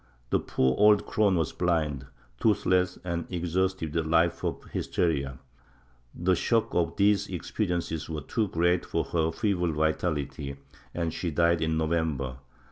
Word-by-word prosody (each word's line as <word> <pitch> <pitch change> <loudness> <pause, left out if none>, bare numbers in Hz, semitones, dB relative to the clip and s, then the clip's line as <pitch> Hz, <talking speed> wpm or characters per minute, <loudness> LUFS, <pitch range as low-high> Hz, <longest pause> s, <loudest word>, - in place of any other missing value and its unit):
The - - +3
poor 65 0 +1
old 105 0 +6
crone 105 -3 +2
was 80 -3 0
blind, 75 -6 0 0.3
toothless 95 -4 +2
and 85 -2 -3
exhausted 90 -2 -1
with 85 -1 +1
a 80 - -5
life 85 +1 +2
of - - -2
hysteria; 70 -6 -1 0.8
the 90 +2 +2
shock 115 +5 +1
of 85 -1 +1
these 100 0 +3
experiences 85 -3 -3
was 75 -2 -4
too 110 -3 0
great 85 0 +1
for - - -1
her 80 -1 0
feeble 90 -3 0
vitality, 75 -3 -1 0.4
and 85 -2 -2
she 90 - -2
died 85 +1 +2
in 80 0 +1
November. 80 -5 -1
85 Hz, 145 wpm, -28 LUFS, 80-90 Hz, 0.8 s, old